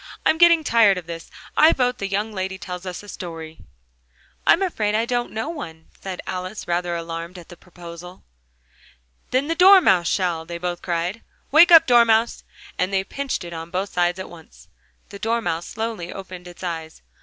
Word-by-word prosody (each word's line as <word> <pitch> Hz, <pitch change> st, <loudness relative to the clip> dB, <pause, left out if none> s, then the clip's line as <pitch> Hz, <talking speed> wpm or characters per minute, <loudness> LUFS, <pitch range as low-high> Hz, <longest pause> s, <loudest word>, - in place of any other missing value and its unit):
"I'm 320 Hz, -, +3 dB
getting 340 Hz, -2 st, +6 dB
tired 225 Hz, -7 st, +4 dB
of 180 Hz, -, -6 dB
this. 165 Hz, 0 st, -8 dB, 0.3 s
I 315 Hz, +2 st, +6 dB
vote 250 Hz, -1 st, 0 dB
the 200 Hz, -, -2 dB
young 205 Hz, +3 st, -2 dB
lady 190 Hz, -1 st, -4 dB
tells 180 Hz, -1 st, -7 dB
us 180 Hz, +2 st, -6 dB
a -, -, -13 dB
story." 165 Hz, -4 st, -8 dB, 0.9 s
"I'm 375 Hz, -, +5 dB
afraid 215 Hz, -, -1 dB
I 225 Hz, +1 st, +1 dB
don't 240 Hz, 0 st, -1 dB
know 220 Hz, +8 st, -4 dB
one," 160 Hz, -, -8 dB
said 190 Hz, -2 st, -6 dB
Alice, 185 Hz, +3 st, -6 dB
rather 175 Hz, 0 st, -1 dB
alarmed 170 Hz, +1 st, -6 dB
at 175 Hz, -, -13 dB
the 175 Hz, -, -11 dB
proposal. 175 Hz, 0 st, -12 dB, 1.1 s
"Then 265 Hz, +3 st, 0 dB
the 330 Hz, -, 0 dB
Dormouse 360 Hz, -, +6 dB
shall!" 175 Hz, -4 st, 0 dB
they 170 Hz, +1 st, -7 dB
both 175 Hz, 0 st, -4 dB
cried. 175 Hz, +4 st, -2 dB, 0.3 s
"Wake 320 Hz, +5 st, +7 dB
up, 330 Hz, -1 st, +9 dB
Dormouse!" 235 Hz, -2 st, +3 dB, 0.4 s
And 185 Hz, +2 st, 0 dB
they 190 Hz, -1 st, +1 dB
pinched 275 Hz, +4 st, -4 dB
it 170 Hz, 0 st, -8 dB
on 165 Hz, 0 st, -7 dB
both 190 Hz, +3 st, -3 dB
sides 175 Hz, 0 st, +1 dB
at 190 Hz, -, -6 dB
once. 165 Hz, -2 st, -16 dB, 0.4 s
The 200 Hz, -2 st, -10 dB
Dormouse 225 Hz, -7 st, -1 dB
slowly 220 Hz, -6 st, -5 dB
opened 185 Hz, -2 st, -9 dB
its 175 Hz, +1 st, -12 dB
eyes. 160 Hz, -, -6 dB
185 Hz, 180 wpm, -22 LUFS, 175-230 Hz, 1.1 s, up